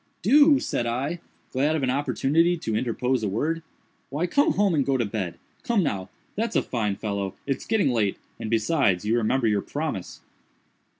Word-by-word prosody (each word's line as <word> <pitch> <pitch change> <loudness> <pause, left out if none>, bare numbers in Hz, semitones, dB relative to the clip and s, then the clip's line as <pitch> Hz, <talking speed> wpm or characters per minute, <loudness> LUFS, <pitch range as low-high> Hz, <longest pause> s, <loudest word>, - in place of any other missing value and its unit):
"Do!" 285 - +6
said 120 - -2
I, 135 +9 -2 0.3
glad 145 +4 +1
of 150 - -1
an 130 - +2
opportunity 150 +5 +2
to 110 -9 -3
interpose 125 +2 0
a 105 - -1
word, 155 +11 -1 0.5
"why 150 +6 -1
come 285 +11 +2
home 200 -3 +2
and 145 -3 +2
go 135 0 +1
to 120 - 0
bed. 100 -5 -4 0.2
Come 230 -5 +1
now!—that's 145 - -4
a - - +3
fine 105 -5 -1
fellow. 100 -2 -3
It's 135 -1 -3
getting 215 -10 +2
late, 105 -5 +1 0.2
and, 110 - -4
besides, 110 - +2
you 110 +2 +2
remember 120 +2 +1
your 105 -2 +2
promise." 145 - -5
130 Hz, 175 wpm, -25 LUFS, 110-165 Hz, 0.5 s, Do